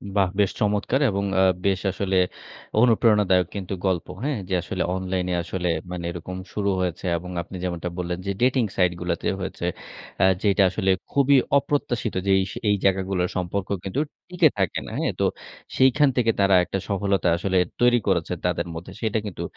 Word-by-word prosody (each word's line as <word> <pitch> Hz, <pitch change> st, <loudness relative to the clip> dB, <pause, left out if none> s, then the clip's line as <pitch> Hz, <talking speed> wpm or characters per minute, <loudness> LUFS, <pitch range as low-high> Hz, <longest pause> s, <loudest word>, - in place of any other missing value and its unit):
বাহ! 95 Hz, -2 st, +3 dB
বেশ 100 Hz, -, +3 dB
চমৎকার 105 Hz, +6 st, +1 dB
এবং 100 Hz, 0 st, -1 dB, 0.2 s
আ -, -, +5 dB, 0.2 s
বেশ 95 Hz, -1 st, +2 dB
আসলে 95 Hz, 0 st, -1 dB, 0.6 s
অনুপ্রেরণাদায়ক 105 Hz, -7 st, +4 dB
কিন্তু 95 Hz, -1 st, -4 dB
গল্প, 90 Hz, -3 st, 0 dB, 0.2 s
হ্যাঁ, 140 Hz, -6 st, -1 dB
যে, -, -, -1 dB
আসলে 95 Hz, +1 st, -3 dB
অনলাইন 95 Hz, -1 st, -2 dB, 0.2 s
আসলে 90 Hz, 0 st, -2 dB, 0.2 s
মানে 90 Hz, -1 st, -4 dB
এরকম 90 Hz, +2 st, -7 dB, 0.2 s
শুরু 100 Hz, -1 st, 0 dB
হয়েছে 90 Hz, 0 st, -2 dB
এবং 90 Hz, +2 st, -8 dB
আপনি 95 Hz, -, -10 dB
যেমনটা 90 Hz, -1 st, -3 dB
বললেন, 90 Hz, 0 st, -2 dB
যে, 100 Hz, -, -1 dB
ডেটিং 125 Hz, -1 st, +3 dB
সাইট 90 Hz, -2 st, +4 dB
গুলাতে 85 Hz, -1 st, -2 dB
হয়েছে। 95 Hz, -2 st, -4 dB, 0.6 s
আ -, -, +7 dB, 0.2 s
যেইটা 100 Hz, -1 st, +3 dB
আসলে 95 Hz, +1 st, 0 dB, 0.2 s
খুবই 140 Hz, 0 st, +4 dB, 0.2 s
অপ্রত্যাশিত 135 Hz, -8 st, -1 dB
যে, 100 Hz, -, +2 dB
এইস 95 Hz, -1 st, -2 dB, 0.2 s
এই 105 Hz, -, +4 dB
জায়গাগুলোর 95 Hz, -1 st, +1 dB
সম্পর্ক 90 Hz, +2 st, -2 dB, 0.2 s
কিন্তু 100 Hz, +9 st, -2 dB, 0.3 s
টিকে 175 Hz, -4 st, +4 dB
থাকে 95 Hz, -4 st, 0 dB
না। -, -, -7 dB
হ্যাঁ? -, -, 0 dB
তো -, -, +3 dB, 0.5 s
সেখান 135 Hz, +2 st, +5 dB
থেকে 115 Hz, -2 st, +3 dB
তারা 100 Hz, -1 st, +5 dB
একটা 95 Hz, -, -3 dB
সফলতা 100 Hz, -2 st, +1 dB
আসলে 95 Hz, +1 st, 0 dB, 0.2 s
তৈরি 120 Hz, 0 st, +5 dB
করেছে -, -, +1 dB
তাদের -, -, 0 dB
মধ্যে। 90 Hz, +3 st, -8 dB
সেটা 110 Hz, -1 st, 0 dB
কিন্তু 100 Hz, -, -5 dB
95 Hz, 170 wpm, -24 LUFS, 90-105 Hz, 0.6 s, আ